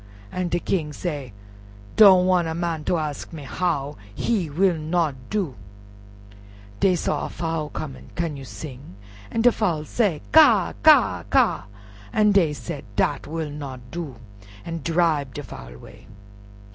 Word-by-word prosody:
An' 180 -1 -2
de 175 - 0
King 155 -5 -2
say, 145 -7 -4 0.6
"Don't 190 -4 +8
wan' 180 -2 +3
a 160 - -3
man 170 -2 -2
ter 175 - +1
ask 150 -3 -4
me 160 -4 -8
how—he 150 - -2
will 180 +4 +2
not 160 -1 0 0.2
do." 195 -10 -1 1.3
Dey 185 -2 +4
saw - - -1
a - - -9
Fowl 160 -3 -3
coming. 140 -4 -7
"Can 165 -3 -2
you 135 - -8
sing?" 125 0 -9 0.3
An' 225 - -1
de 245 - +7
Fowl 170 -10 -1
say 190 - 0
"Ka! - - +6
ka! - - +5
ka!" - - +3 0.5
an' 210 - +4
dey 185 -6 +4
said, 150 0 -6
"Dat 135 +7 0
will 160 -1 -4
not 130 -4 -8
do," 160 -6 -5 0.5
an' 165 -1 -5
dribe 160 -6 +1
de - - -5
Fowl - - -10
'way. - - -15
160 Hz, 150 wpm, -23 LUFS, 145-175 Hz, 1.3 s, Don't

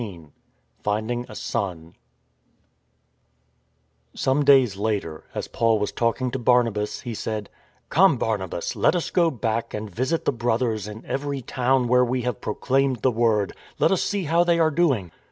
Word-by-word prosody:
XVII 90 -8 -8 0.6
FIfNDING 110 +4 -1
A 110 - -9
SON 85 -6 -4 2.2
SOME 135 +3 +1
days 135 -7 +5
later, 100 -6 -3
as - - -3
Paul 115 -1 +2
was 105 0 -2
talking 120 +2 0
to 130 - -3
Barnabas, 115 -4 +1
he 120 - -5
said: 110 -1 -4 0.2
" - - -39
Come, 180 -3 +5
Barnabas, 100 -7 -2
let - - +3
us 175 - -2
go 170 -2 +3
back 115 -5 -2
and 105 0 -4
visit 130 - -1
the - - +3
brothers 115 -3 -1
in 105 +1 -9
every 140 -1 -3
town 125 +1 +1
where 125 +1 +4
we 125 0 -1
have 125 -3 -3
proclaimed 135 +2 0
the 130 - +4
iWord. 110 -3 +1 0.3
Let - - +3
us 190 - +2
see 200 -2 -1
how 165 +2 +3
they 170 -1 +2
are 160 -1 +3
doing." 140 - +1
120 Hz, 165 wpm, -24 LUFS, 105-135 Hz, 2.2 s, days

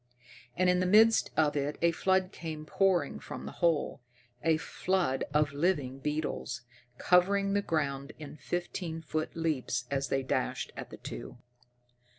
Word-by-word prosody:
And 185 - +3
in 180 0 +4
the 185 - +1
midst 220 +4 +6
of 150 -2 +3
it 145 +1 -1
a 170 - +5
flood 190 +2 +1
came 155 -2 -6
pouring 180 -3 +1
from 65 - -7
the 70 - -5
hole 165 -6 +1 0.4
a 160 -1 +4
flood 175 -5 0
of 150 -1 +2
living 145 -4 0
beetles, 150 -3 -3 0.4
covering 195 +4 +3
the 205 - +2
ground 140 -5 -1
in 155 -1 -9
fifteen 170 +1 -4
foot 155 0 -3
leaps 145 -7 -1
as 135 -1 0
they 135 +1 0
dashed 130 - -1
at - - -7
the - - -9
two. - - -8
160 Hz, 155 wpm, -31 LUFS, 140-180 Hz, 0.4 s, midst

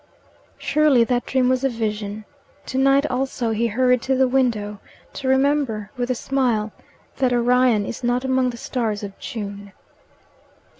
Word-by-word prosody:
Surely 295 -5 +3
that 245 +1 -1
dream 260 -1 +2
was 255 +1 +1
a 270 - +3
vision! 215 -2 -4 0.4
To 260 - -2
night 275 +1 +4
also 255 -3 -1
he 225 +2 +1
hurried 250 +2 +2
to 265 +1 0
the 260 0 +3
window 230 -6 0 0.3
to 270 - -5
remember, 265 -6 +1
with 245 -1 -3
a 255 - +1
smile, 235 -5 0 0.5
that 260 -2 +2
Orion 245 -3 +3
is 235 - -6
not 245 +2 0
among 260 -1 +2
the 235 - -7
stars 225 -4 -3
of 200 -1 -7
June. 200 -2 -7
245 Hz, 155 wpm, -22 LUFS, 220-260 Hz, 0.5 s, night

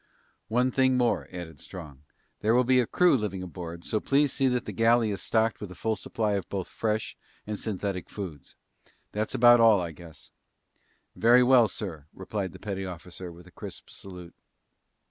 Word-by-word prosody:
"One 125 +3 +2
thing 130 0 +3
more," 120 -2 +1
added 85 -5 -8
Strong. 75 -6 -10 0.4
"There 110 +2 +2
will 125 - +5
be 130 +1 +4
a 120 - +1
crew 180 -4 +4
living 100 -6 -2
aboard, 85 -1 -8
so 110 - 0
please 140 +2 +2
see 135 - +2
that 125 -1 0
the - - -4
galley 115 -1 +3
is 100 - -4
stocked 110 0 +1
with 105 - -5
a 90 - -10
full 110 +3 -1
supply 110 0 -2
of 100 -3 -2
both 95 -3 -4
fresh 110 -1 -2 0.3
and 105 -1 -4
synthetic 100 -3 -3
foods. 85 -9 -8 0.6
That's 105 +1 -2
about 120 0 +7
all, 110 -3 +6
I 85 -2 -3
guess." 80 -1 -13 0.8
"Very 120 +2 +6
well, 125 -2 +6
sir," 80 -10 -6
replied 95 0 -4
the - - -11
petty 95 -2 -4
officer 90 0 -8
with 85 +1 -14
a 90 - -16
crisp - - -9
salute. 90 -3 -10
105 Hz, 185 wpm, -28 LUFS, 90-120 Hz, 0.8 s, about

